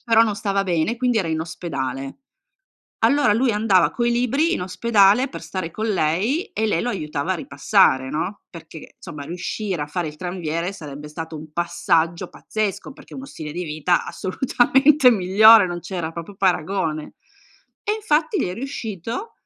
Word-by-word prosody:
Però 225 -1 +5
non 215 -2 0
stava 200 -1 -1
bene 180 +5 0
quindi 245 -1 +1
era 185 -5 -1
in 160 0 -1
ospedale. 135 - -5 0.9
Allora 285 -6 +4
lui 240 +4 +2
andava 210 -4 +3
coi 240 -1 0
libri 270 +8 +1
in - - -2
ospedale 200 +5 +3
per - - -9
stare 185 -4 -5
con 220 +5 -3
lei 205 - 0
e 220 - -1
lei 205 -6 +1
lo 245 - -2
aiutava 155 -4 -2
a - - -1
ripassare, 140 -3 +2
no, 180 +6 -4
perché 165 -2 -12
insomma 150 -5 -8
riuscire 180 +2 -4
a 145 - -6
fare 175 +2 -3
il 150 - -6
tranviere 175 +1 -3
sarebbe 150 -4 -9
stato 160 +1 -7
un 155 0 -11
passaggio 170 0 0
pazzesco, 215 +4 -4
perché - - -15
uno 265 - -7
stile 155 - -8
di 175 +4 -4
vita 155 +2 0
assolutamente 265 +6 +3
migliore, 210 +1 +6
non 175 -1 -5
c'era 175 -2 -5
proprio 170 +4 -8
paragone. 175 -4 -1 0.7
E 415 - 0
infatti 405 -2 0
gli - - 0
è 180 - -4
riuscito 235 - -5
185 Hz, 165 wpm, -22 LUFS, 160-225 Hz, 0.9 s, migliore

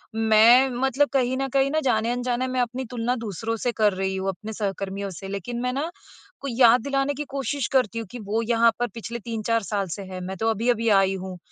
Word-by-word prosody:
मैं 225 +4 +6
मतलब 265 +3 +1
कहीं 260 -1 +1
न 270 0 -1
कहीं 275 0 +3
न 315 - +2
जाने-अनजाने 245 +1 0
मैं 255 -1 0
अपनी 250 +2 -3
तुलना 245 0 -1
दूसरों 225 -1 -4
से 245 - +2
कर 210 -2 +3
रही 190 0 -2
हूँ, 190 0 -2
अपने 215 +4 -6
सहकर्मियों 195 -1 -3
से। 195 - -7
लेकिन 200 +5 -4
मैं 250 0 -1
ना 290 +5 -2 0.5
कोई 275 -4 -4
याद 240 0 +7
दिलाने 275 0 0
की 295 +2 -4
कोशिश 275 -1 -1
करती 230 -3 0
हूँ 225 - -6
कि 245 - -7
वो 220 +2 +1
यहाँ 230 0 +5
पर 245 - +1
पिछले 235 +1 -5
3-4 230 0 -1
साल 200 -1 -2
से 200 - -7
हैं, 185 -1 -7
मैं 190 +1 -5
तो 225 0 0
अभी-अभी 230 +1 +1
आई 195 0 +1
हूँ। 185 -1 -6
230 Hz, 220 wpm, -24 LUFS, 205-250 Hz, 0.5 s, याद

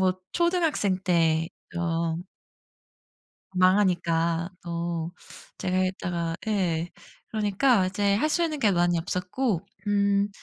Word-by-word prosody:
뭐 185 -1 +2
초등학생 340 - +1
때 165 -2 +2 0.3
어 165 -1 0 1.4
망하니까 175 -3 +2
또 170 -1 -3 0.5
제가 185 0 -1
했다가 175 -3 -1
예. 175 -5 0 0.4
그러니까 210 0 +2
이제 200 +1 +1
할 305 +9 +1
수 340 +2 +2
있는 310 -3 -1
게 215 -6 +4
많이 175 -1 +2
없었고 180 +4 -1 0.3
음 200 0 +2
185 Hz, 200 characters per minute, -26 LUFS, 170-205 Hz, 1.4 s, 게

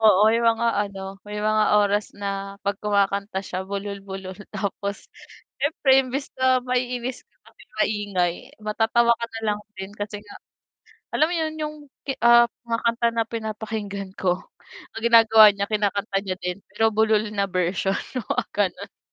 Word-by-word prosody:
Oo 215 -1 +6
'yong 230 +1 +2
mga 235 +1 0
ano 195 -1 -4
may 210 0 -5
mga 215 0 +3 0.2
oras 205 +1 0
na 195 -1 -4
'pag 200 0 -1
kumakanta 200 -1 0
siya 185 0 -5
bulol-bulol 195 -1 -6 0.2
tapos 200 0 -4 0.5
siyempre 285 0 0
imbis 270 +2 -2
na 260 -1 +3
maiinis 250 - -2
ka - - -43 0.2
kasi - - -20 0.2
maingay 200 -5 0 0.3
matatawa 225 +2 +2
ka 235 - -3
na 225 - -4
lang 205 - -1 0.2
din 190 +1 -7
kasi 205 0 -5
nga, 205 - -13 0.8
alam 310 - +3
mo 350 - -3
'yon 315 -1 -1
'yong, 305 0 -4 0.5
ah, 235 0 +7 0.2
mga 230 -1 -2
kanta 235 0 +2
na 230 0 0
pinapakinggan 215 -3 -5
ko 180 -2 0 0.6
ang 225 - -6
ginagawa 225 -2 +8
niya 200 0 -2
kinakanta 205 -1 -1
niya 185 -2 -3
din 180 0 -4
pero 220 +2 +1
bulol 220 0 +3
na 200 -1 0
version, 185 +2 0 0.3
oo - - 0 0.2
gano'n. 205 -3 -2
210 Hz, 155 wpm, -24 LUFS, 200-230 Hz, 0.8 s, ginagawa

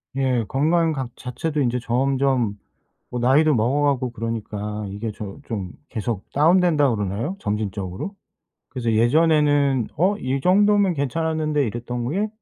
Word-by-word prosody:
예 130 -4 +1
건강 160 +4 +2
각 130 -4 -5
자체도 145 +4 -3
이제 125 -1 +1
점점 130 -3 +1 0.5
뭐 125 - -4
나이도 145 +6 +4
먹어 125 +5 +1
가고 130 -4 +1
그러니까 105 -2 -4
이게 105 +3 -4
저 100 +1 -8
좀 100 -6 -4 0.2
계속 110 -3 -3
다운된다고 155 -4 +4
그러나요? 105 - -2
점진적으로? 105 - -3 0.5
그래서 120 -4 -2
예전에는 145 0 +3
'어 190 +5 +2
이 130 +2 -2
정도면 200 +2 +4
괜찮았는데.' 155 +1 0
이랬던 120 +2 -4
게 205 +5 0
130 Hz, 310 characters per minute, -22 LUFS, 115-155 Hz, 0.5 s, 나이도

